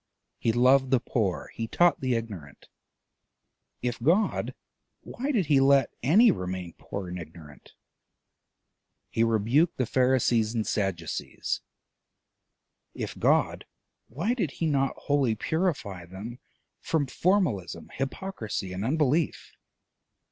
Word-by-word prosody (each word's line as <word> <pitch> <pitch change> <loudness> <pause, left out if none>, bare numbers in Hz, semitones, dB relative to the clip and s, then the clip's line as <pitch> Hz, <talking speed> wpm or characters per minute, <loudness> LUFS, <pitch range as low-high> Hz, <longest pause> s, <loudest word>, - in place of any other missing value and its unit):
He 115 - +2
loved 130 +3 +4
the 130 -1 +4
poor, 105 -6 -2
he 115 - -4
taught 175 +7 +3
the 130 -2 +1
ignorant: 100 -12 -7 1.1
if 120 -2 -2
God, 175 - +1 0.5
why 270 +4 -4
did 215 - +1
he 145 -2 +4
let 135 -1 +4
any 205 - +6
remain 90 - -4
poor 100 -2 -6
and 90 0 -5
ignorant? 80 -3 -12 1.4
He 115 - +2
rebuked 115 - +2
the 130 - +1
Pharisees 120 -3 +2
and 110 -2 0
Sadducees: 95 -6 -2 1.3
it - - -5
God, - - +2 0.4
why 170 - -1
did 210 - -1
he 165 - -2
not 135 -3 +1
wholly 140 -6 +1
purify 110 - -2
them 105 +7 -8 0.4
from 160 -3 0
formalism, 125 - 0
hypocrisy, 135 - -4
and 95 +2 -4
unbelief? 150 +4 0
125 Hz, 115 wpm, -27 LUFS, 100-150 Hz, 1.4 s, any